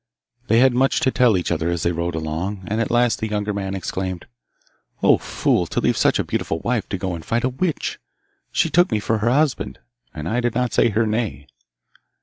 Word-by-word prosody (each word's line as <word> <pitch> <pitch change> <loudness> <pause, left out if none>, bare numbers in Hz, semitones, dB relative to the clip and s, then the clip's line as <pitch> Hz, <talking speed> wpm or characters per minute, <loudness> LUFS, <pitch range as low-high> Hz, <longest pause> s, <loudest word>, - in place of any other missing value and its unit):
They 115 - +4
had 130 +1 +5
much 130 +2 +2
to 130 - +2
tell 120 -7 +4
each 90 - -2
other 85 0 0
as 85 -1 -1
they 85 - +2
rode 85 0 -2
along, 80 +5 -3
and 110 +4 -1
at 115 - -1
last 120 0 +2
the 110 - -2
younger 105 -1 -2
man 95 -1 -3
exclaimed, 95 -2 -4 0.8
'O - - +5
fool, - - 0
to - - -2
leave - - +1
such - - +3
a - - 0
beautiful 80 - -2
wife 115 +4 -2
to 95 - -2
go 95 -1 -3
and 85 -2 -6
fight 115 +6 -1
a 130 - +2
witch! 155 +6 -2 0.5
She 165 - +1
took 175 -3 +4
me 110 - +1
for 110 +1 0
her 110 +3 +1
husband, 145 +2 +1 0.3
and 75 +1 -6
I 120 +6 0
did 120 -2 -1
not 125 -1 0
say 120 - +4
her 110 +2 +1
nay. 105 - -2
105 Hz, 220 wpm, -21 LUFS, 90-120 Hz, 0.8 s, had